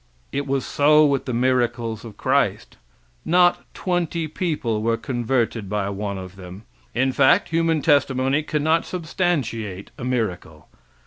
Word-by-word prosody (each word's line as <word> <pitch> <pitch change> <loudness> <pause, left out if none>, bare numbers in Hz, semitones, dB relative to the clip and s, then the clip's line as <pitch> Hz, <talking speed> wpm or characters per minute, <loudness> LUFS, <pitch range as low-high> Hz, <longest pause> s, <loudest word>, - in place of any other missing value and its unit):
It 140 +1 -3
was 135 -1 -1
so 150 +1 +4
with 140 -2 +1
the 130 - -3
miracles 120 -2 0
of 115 -3 -10
Christ. - - 0 0.5
Not 175 +1 +3
twenty 170 -3 -1
people 150 -10 -2
were 115 +1 +1
converted 120 -4 -1
by 100 -1 -1
one 100 0 -4
of 95 0 -9
them. 95 +2 -10 0.3
In 130 +2 +2
fact, 130 0 +4
human 165 -2 +1
testimony 140 -1 +2
cannot 155 +2 +1
substantiate 140 - -2
a - - -6
miracle. 100 -11 -3
130 Hz, 135 wpm, -22 LUFS, 110-155 Hz, 0.5 s, so